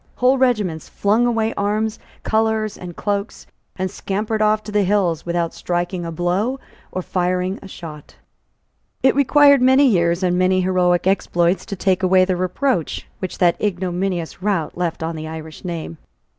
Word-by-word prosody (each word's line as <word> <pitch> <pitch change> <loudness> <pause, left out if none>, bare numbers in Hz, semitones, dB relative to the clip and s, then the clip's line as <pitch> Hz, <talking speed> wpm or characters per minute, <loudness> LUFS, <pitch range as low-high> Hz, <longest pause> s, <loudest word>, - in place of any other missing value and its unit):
Whole 255 +2 +3
regiments 210 - 0
flung 220 +4 +2
away 225 -1 0
arms, 210 +2 -1 0.2
colours 220 -1 0
and 175 -2 -9
cloaks, 205 0 -3 0.3
and 185 0 -3
scampered 215 +2 -2
off 215 0 +2
to 210 - -8
the 210 0 +2
hills 180 -5 +1
without 170 -1 -1
striking 175 0 -3
a - - -4
blow 185 +10 -1 0.3
or 185 - -3
firing 180 +1 -1
a - - -10
shot, 155 -5 -10 0.9
It 265 - +5
required 280 0 +5
many 260 +2 +5
years 170 -6 +2
and 180 0 +1
many 185 0 +3
heroic 180 -1 +2
exploits 180 -2 +1
to 205 - -4
take 185 0 +1
away 185 0 +4
the 185 -1 0
reproach 185 - -1
which 185 - -5
that 175 -2 +2
ignominious 180 -3 -2
rout 190 -6 -1
left 170 -2 -2
on 165 0 -3
the 155 0 -6
Irish 160 0 -8
name. 165 -2 -5
185 Hz, 160 wpm, -20 LUFS, 175-215 Hz, 0.9 s, It